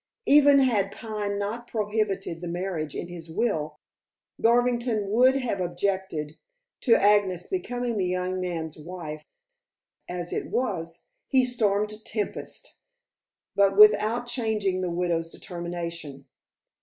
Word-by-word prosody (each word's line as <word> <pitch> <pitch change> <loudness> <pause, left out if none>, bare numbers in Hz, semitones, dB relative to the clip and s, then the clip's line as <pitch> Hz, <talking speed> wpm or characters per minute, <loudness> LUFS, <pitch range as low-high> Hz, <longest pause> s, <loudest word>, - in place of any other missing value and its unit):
Even 285 0 +7
had 215 -7 +2
Pine 210 -2 -4
not 220 +4 -4
prohibited 210 -6 -2
the 175 - -5
marriage 170 -3 -3
in - - -4
his 170 -2 -9
will, 160 -5 -1 0.6
Garvington 235 -3 +2
would 255 +4 +5
have 245 -8 -1
objected 175 -3 -2 0.4
to 235 - +4
Agnes 200 -3 +3
becoming 245 - -2
the 185 - +1
young 180 +1 -1
man's 165 -3 -4
wife; 155 -2 -7 0.8
as 175 -1 -4
it - - -3
was, 170 -9 -3 0.2
he 260 -2 +4
stormed 215 -3 0
tempests, 215 -2 -5 0.8
but 195 -1 +3
without 215 +3 +6
changing 220 -6 -1
the 180 - -1
widow's 170 -1 -1
determination. 170 -5 -6
200 Hz, 120 wpm, -26 LUFS, 175-225 Hz, 0.8 s, Even